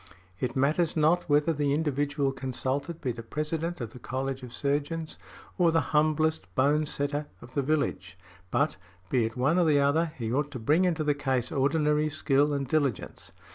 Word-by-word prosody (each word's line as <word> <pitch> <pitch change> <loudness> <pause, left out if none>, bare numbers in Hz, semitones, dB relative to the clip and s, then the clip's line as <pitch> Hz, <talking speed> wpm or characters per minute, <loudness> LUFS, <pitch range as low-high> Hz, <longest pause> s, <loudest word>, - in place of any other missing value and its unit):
It 120 -1 -2
matters 155 +5 +1
not 160 +3 +2
whether 150 +3 +3
the 145 -1 +1
individual 145 -2 0
consulted 135 +4 -3
be 130 - -1
the 115 0 -7
President 155 +7 -3
of 115 -3 -6
the 125 - -10
College 135 +2 -3
of 125 -2 -9
Surgeons, 145 +4 -2 0.4
or 170 -2 +5
the 165 - +3
humblest 155 +1 +1
bone 145 +3 +2
setter 145 +1 -2
of 120 +4 -14
the 140 - +1
village; 130 - -1 0.3
but, 80 - +1 0.3
be 120 -3 +3
it 115 +3 -5
one 150 +8 +2
or 175 - +4
the 150 -3 +4
other, 155 +4 +2
he 115 -2 -3
ought 145 +2 0
to - - -4
bring 150 +11 +3
into 165 -3 0
the 150 -1 +2
case 130 -4 -1
ordinary 150 +2 +2
skill 145 -1 +2
and 140 -2 -1
diligence. 140 -7 -1
145 Hz, 180 wpm, -28 LUFS, 130-155 Hz, 0.4 s, or